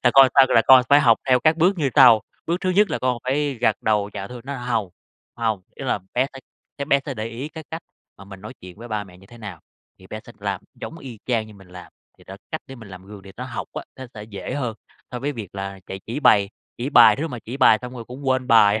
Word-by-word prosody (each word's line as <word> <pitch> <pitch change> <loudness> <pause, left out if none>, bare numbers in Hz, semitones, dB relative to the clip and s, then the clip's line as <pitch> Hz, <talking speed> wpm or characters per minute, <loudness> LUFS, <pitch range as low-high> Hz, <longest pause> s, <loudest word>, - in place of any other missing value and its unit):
Là 125 - +5
con 135 0 +9
sao? 135 -1 +7
Là 115 - +4
con 130 -1 +8
phải 145 +1 +6
học 120 -5 +4
theo 125 -1 +4
các 155 +3 +3
bước 180 +3 +2
như 145 - +1
sau. 120 -6 +8 0.3
Bước 170 +2 0
thứ 185 - 0
nhất 205 +3 +3
là - - -1
con 125 -2 0
phải 140 +2 0
gật 110 - +2
đầu 105 -2 +1
dạ 100 - -5
thưa" 125 -1 -9
nói 140 +1 -5
hông, 120 -5 -2 0.5
hông, 110 -5 -1
ý 135 - -8
là 125 - 0 0.2
bé 130 +2 +2
sẽ 135 - -10 0.4
sẽ 140 - -2
bé 140 -1 +2
sẽ 140 - -4
để 110 -1 -4
ý 120 +5 -6
cái 160 0 -10
cách 160 +1 -6 0.4
mà 100 - -12
mình 95 -1 -12
nói 110 +5 -9
chuyện 90 -1 -12
với 120 - -10
ba 105 -2 -3
mẹ 90 -2 -16
như 95 - -18
thế 120 +2 -15
nào 100 -7 -9 0.4
thì - - -16
bé - - -7
sẽ - - -13
làm - - -3
giống 165 - -8
y 125 -7 -10
chang 115 -3 0
như 110 - -14
mình 95 -2 -17
làm. 90 0 -12 0.3
Thì - - -19
đó, 95 - -10
cách 155 - -3
để 135 - -10
mình 115 -4 -12
làm 95 0 -12
gương 100 -1 -11
để 95 0 -13
nó - - -5
học - - -6
á, - - -5
nó 130 -1 -8
sẽ 105 - -8
dễ 105 +3 -7
hơn 125 -6 -3 0.4
so 125 - -5
với 145 +4 -2
việc 110 -8 -8
là 95 0 -6
chạy 95 - -7
chỉ 120 +7 -4
bày, 100 -7 +4 0.3
chỉ 130 +4 -3
bài 115 -5 +7
rứa, 165 - -2
mà 125 - -6
chỉ 125 +4 -6
bài 110 - +5
xong 125 0 -7
rồi 120 -2 -7
cũng 130 +4 -10
quên 130 -1 +1
bài. 110 -2 +5
120 Hz, 285 wpm, -22 LUFS, 105-135 Hz, 0.5 s, con